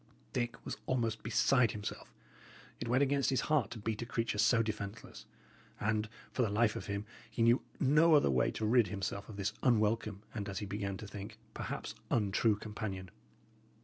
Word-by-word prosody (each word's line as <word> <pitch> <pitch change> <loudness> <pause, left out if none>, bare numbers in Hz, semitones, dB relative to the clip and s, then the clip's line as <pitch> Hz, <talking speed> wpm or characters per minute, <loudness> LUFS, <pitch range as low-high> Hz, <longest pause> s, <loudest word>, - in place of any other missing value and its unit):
Dick 120 -1 -1
was - - -4
almost 115 -4 0
beside 115 +1 +3
himself. 105 -1 -6 0.7
It 120 - -4
went 125 +4 +4
against 140 0 +2
his 130 - +2
heart 150 -9 +2
to 120 - -7
beat 110 +1 -3
a - - -2
creature 115 -3 -1
so 115 +1 +5
defenceless; 105 -1 -6 0.5
and, 105 +1 0 0.2
for - - -1
the 115 - +2
life 110 +1 +2
of - - -5
him, 100 0 -3 0.2
he 115 - 0
knew 120 +2 +5 0.2
no 150 +4 +6
other 145 - +5
way 65 - +3
to 110 - -3
rid 115 0 +5
himself 100 0 -4
of 110 - -8
this 100 +2 -1
unwelcome 110 -3 +2
and, 105 -3 -4
as 100 - -4
he 105 - -2
began 100 0 -3
to 105 - -8
think, 105 +3 -8 0.2
perhaps - - -4 0.2
untrue 105 0 +3
companion. 105 -3 -5
110 Hz, 180 wpm, -34 LUFS, 105-120 Hz, 0.7 s, no